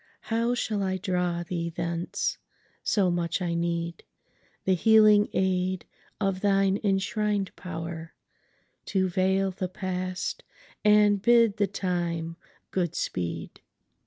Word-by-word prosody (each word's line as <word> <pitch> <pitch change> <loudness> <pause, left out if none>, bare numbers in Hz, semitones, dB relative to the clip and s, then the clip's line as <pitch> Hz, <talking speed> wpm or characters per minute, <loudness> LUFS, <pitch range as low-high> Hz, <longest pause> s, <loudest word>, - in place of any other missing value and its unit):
How 230 +2 +2
shall 215 -4 -1
I 190 -1 0
draw 180 -2 -1
thee 170 -1 -3
thence?—so 170 +3 -2
much 170 0 -1
I 175 -2 -1
needThe 170 +2 -4
healing 215 +1 +6
aid 185 -1 0 0.3
of 195 -2 0
thine 195 -1 +3
enshrined 205 0 0
powerTo 170 +2 -6
veil 190 +1 +2
the 185 0 -4
past, 185 0 -3 0.4
and 210 -1 +5
bid 230 -2 +5
the 205 -1 +2
time 170 -3 -2 0.4
good 175 -4 -1
speed! 85 -2 -4
185 Hz, 100 wpm, -27 LUFS, 170-200 Hz, 0.4 s, healing